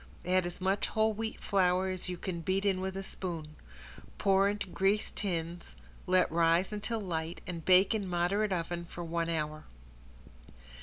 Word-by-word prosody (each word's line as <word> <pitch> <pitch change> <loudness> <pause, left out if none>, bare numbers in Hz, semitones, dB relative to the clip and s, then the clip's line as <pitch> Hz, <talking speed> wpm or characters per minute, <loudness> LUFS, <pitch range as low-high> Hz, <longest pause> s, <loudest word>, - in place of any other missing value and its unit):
Add 185 0 +2
as 175 - -7
much 190 +2 +1
whole 220 0 +2
wheat 220 +1 -4
flour 185 -1 +2
as 185 0 -3
you 180 - -3
can 170 -1 -4
beat 190 +4 0
in 190 -2 +2
with 190 0 -3
a 195 - -3
spoon. 165 -6 -6 0.6
Pour 195 0 +4
into 205 0 -2
greased 195 +3 0
tins, 170 - -3 0.3
let 185 -2 +3
rise 170 +4 +3
until 220 +2 -2
light 170 -3 -3
and 170 -3 -5
bake 185 +4 +5
in 205 -3 -1
moderate 185 +4 +1
oven 170 -1 -2
for 175 0 -7
one 165 0 -1
hour. 155 -1 -2
185 Hz, 165 wpm, -31 LUFS, 170-195 Hz, 0.6 s, bake